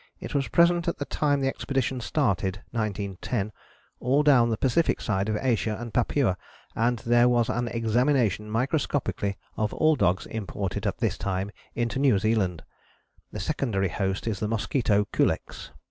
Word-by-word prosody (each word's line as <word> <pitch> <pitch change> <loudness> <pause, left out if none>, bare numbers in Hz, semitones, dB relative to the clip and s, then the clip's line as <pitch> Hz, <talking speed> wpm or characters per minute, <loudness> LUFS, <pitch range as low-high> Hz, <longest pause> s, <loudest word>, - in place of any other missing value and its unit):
It - - -7
was 140 -3 0
present 170 +6 +3
at 170 - 0
the 145 - -3
time 145 -1 0
the 135 - +1
expedition 135 -1 -1
started 100 - 0
(1910) 105 -1 -2 0.5
all 135 +4 +2
down 130 -5 +5
the 110 - 0
Pacific 135 +8 +2
side 100 -1 -1
of 110 - 0
Asia 115 -4 0
and 120 -2 -7
Papua, 120 -5 +1 0.4
and 120 +2 +1
there 120 +1 +5
was 120 -2 +2
an 120 0 -1
examination 115 -2 +1
microscopically 125 - -1 0.2
of 105 -1 -1
all 155 0 +4
dogs 95 -6 +1
imported 100 -1 -4
at 100 - -2
this 110 -6 -1
time 95 +1 -2 0.2
into 120 +2 -1
New 135 -7 +4
Zealand. 100 -5 0 0.7
The - - -6
secondary 100 -4 -1
host 95 +3 -2
is 110 -4 -2
the 105 - -1
mosquito 105 -1 +1
Culex. - - -1
115 Hz, 160 wpm, -26 LUFS, 100-130 Hz, 0.7 s, down